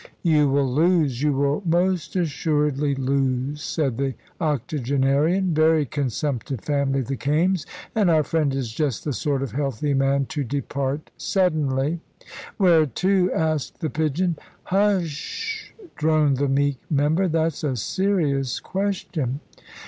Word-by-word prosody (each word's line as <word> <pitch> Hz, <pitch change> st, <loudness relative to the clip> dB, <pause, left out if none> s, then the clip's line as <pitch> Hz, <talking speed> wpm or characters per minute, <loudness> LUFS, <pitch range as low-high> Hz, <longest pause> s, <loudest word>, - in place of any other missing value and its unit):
"You 150 Hz, -4 st, +4 dB
will 140 Hz, 0 st, +2 dB
lose; 150 Hz, -2 st, +2 dB
you 150 Hz, 0 st, +3 dB
will 140 Hz, +4 st, +1 dB
most 175 Hz, 0 st, 0 dB
assuredly 150 Hz, -4 st, 0 dB
lose," 135 Hz, +1 st, -1 dB
said 135 Hz, -8 st, -1 dB
the 135 Hz, -1 st, -1 dB, 0.2 s
octogenarian. 150 Hz, -, +1 dB
"Very 155 Hz, -1 st, +4 dB
consumptive 135 Hz, -2 st, -2 dB
family, 140 Hz, -2 st, 0 dB
the 135 Hz, +2 st, -3 dB
Kaimes. 160 Hz, +6 st, +1 dB, 0.3 s
And 210 Hz, -5 st, +3 dB
our 160 Hz, -2 st, +4 dB
friend 155 Hz, -2 st, 0 dB
is 130 Hz, -4 st, -3 dB
just 135 Hz, -1 st, -2 dB
the 145 Hz, -, -2 dB
sort 135 Hz, +3 st, -1 dB
of 135 Hz, -, -4 dB
healthy 140 Hz, 0 st, -1 dB
man 135 Hz, 0 st, +2 dB
to 150 Hz, -2 st, -2 dB
depart 140 Hz, +2 st, -3 dB
suddenly." 155 Hz, -4 st, 0 dB, 0.6 s
"Where 170 Hz, -5 st, +5 dB
to?" 185 Hz, -, +1 dB
asked 155 Hz, -3 st, -1 dB
the 155 Hz, -, -2 dB
pigeon. 160 Hz, +2 st, 0 dB, 0.3 s
"Hu -, -, +1 dB
s 200 Hz, -2 st, +3 dB
s -, -, -4 dB
sh!" 430 Hz, -, -5 dB, 0.3 s
droned 155 Hz, -3 st, +2 dB
the 140 Hz, +1 st, 0 dB
meek 140 Hz, -1 st, +1 dB
member; 155 Hz, +5 st, +2 dB
"that's 160 Hz, -2 st, 0 dB
a 140 Hz, -4 st, 0 dB
serious 140 Hz, -, 0 dB
question." 180 Hz, -9 st, -2 dB
150 Hz, 140 wpm, -23 LUFS, 135-165 Hz, 0.6 s, Where